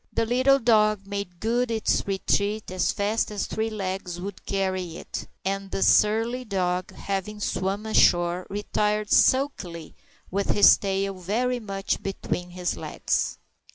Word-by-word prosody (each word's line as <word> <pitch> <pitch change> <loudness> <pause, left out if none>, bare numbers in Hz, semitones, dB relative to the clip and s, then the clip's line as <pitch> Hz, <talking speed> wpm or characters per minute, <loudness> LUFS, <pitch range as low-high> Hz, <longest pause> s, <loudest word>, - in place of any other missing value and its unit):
The 230 - 0
little 255 +4 +4
dog 215 -5 +3
made 200 -3 -5
good 240 +4 0
its 225 -2 0
retreat 200 +1 0
as 185 -1 +1
fast 210 +3 0
as 210 -2 -3
three 220 +1 -2
legs 190 -4 -4
would 195 +1 -8
carry 185 -3 -2
it; - - -7 0.2
and 195 0 -2
the 195 - -1
surly 225 +4 +3
dog, 185 -4 -1
having 200 +2 -4
swum 195 +1 -2
ashore, 175 -4 +3
retired 210 +1 -1
sulkily, 190 - +2 0.4
with 200 +1 -1
his 205 - +7
tail 195 0 -1
very 225 +7 -1
much 195 -3 -3
between 180 -2 -4
his 180 -1 -3
legs. - - -2
200 Hz, 140 wpm, -25 LUFS, 185-215 Hz, 0.4 s, his